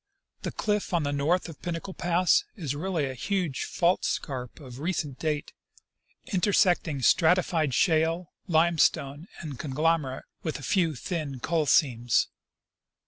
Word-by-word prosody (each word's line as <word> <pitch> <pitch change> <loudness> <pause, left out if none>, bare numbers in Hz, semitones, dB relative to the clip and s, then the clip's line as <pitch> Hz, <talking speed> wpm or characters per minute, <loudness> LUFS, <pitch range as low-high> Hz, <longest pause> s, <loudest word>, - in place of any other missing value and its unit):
The - - -3
cliff 210 -3 -1
on 165 - +1
the 145 0 -1
north 155 +7 +1
of 165 -4 -11
Pinnacle 175 +2 -4
pass 175 0 +2
is 155 -9 -3
really 165 -1 -1
a 135 - -4
huge 175 - -2
fault 175 +1 +1
scarp 125 -4 -3
of 130 -3 -10
recent 155 -5 -2
date, 150 -2 -2 0.8
intersecting 180 -7 +2
stratified 165 -4 +3
shale, 165 +2 +2
limestone, 160 -2 +2
and 145 -7 -7
conglomerate, 150 -1 0 0.2
with 160 - -3
a 145 - -11
iew 165 -5 +1
thin 150 -4 -4
coal 155 +3 0
seams. 120 -6 +3
160 Hz, 135 wpm, -27 LUFS, 140-175 Hz, 0.8 s, stratified